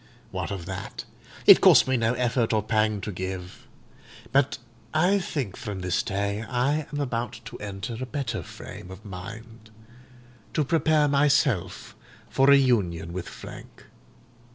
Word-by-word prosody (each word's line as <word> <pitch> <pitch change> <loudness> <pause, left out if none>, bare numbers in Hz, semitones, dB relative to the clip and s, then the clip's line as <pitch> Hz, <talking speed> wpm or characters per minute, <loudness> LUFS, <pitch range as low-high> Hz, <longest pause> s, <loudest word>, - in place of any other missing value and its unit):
What - - -3
of 95 -4 -5
that? 95 +1 -6 0.4
It - - +9
cost - - +7
me 130 - +2
no 115 -1 +1
effort 120 -2 +1
or 105 -1 +2
pang 110 -1 +1
to 105 - -4
give. 95 0 -6 0.6
But 140 0 +2 0.4
I 180 +6 +4
think 140 - -3
from 100 -3 -6
this 90 -1 0
day 100 +1 -2
I 140 +5 0
am 145 - -3
about 120 -4 -3
to - - -8
enter 105 +3 -5
a 130 - -3
better 120 -3 -3
frame 90 - -10
of 95 +3 -11
mind, 110 +4 -9 0.9
to 150 - +2
prepare 155 0 +3
myself 140 - +1 0.4
for 135 0 +3
reunion 105 -12 +3
with 90 -1 -5
Frank. - - -11
115 Hz, 145 wpm, -26 LUFS, 100-135 Hz, 0.9 s, It